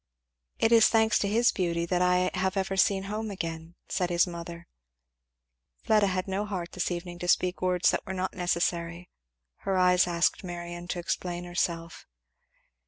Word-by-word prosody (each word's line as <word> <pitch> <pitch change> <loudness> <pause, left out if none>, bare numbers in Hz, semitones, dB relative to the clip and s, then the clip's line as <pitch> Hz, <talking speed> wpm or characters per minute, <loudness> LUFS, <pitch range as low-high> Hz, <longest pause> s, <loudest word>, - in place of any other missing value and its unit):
"It 225 - +2
is 230 -1 +7
thanks 220 -1 +3
to 200 - 0
his 230 +4 +3
beauty 170 -2 -1
that 180 +1 0
I 180 0 +2
have 190 +1 -1
ever 195 0 -1
seen 190 0 +2
home 210 +2 -4
again," 165 -3 -6
said 180 -2 -1
his 175 -1 +3
mother. 170 -1 -8 1.2
Fleda 210 -2 +3
had 185 0 -2
no 195 +2 -1
heart 180 -4 -4
this 180 - -2
evening 175 0 -5
to 175 - -4
speak 180 +1 +1
words 180 -1 +2
that - - -2
were 190 - -4
not 185 0 -2
necessary; 170 -1 -2 0.5
her 190 -1 -2
eyes 180 0 +4
asked 170 +2 +1
Marion 175 -1 -7
to 175 - -3
explain 175 0 -3
herself. 170 -1 -3
180 Hz, 170 wpm, -28 LUFS, 175-190 Hz, 1.2 s, is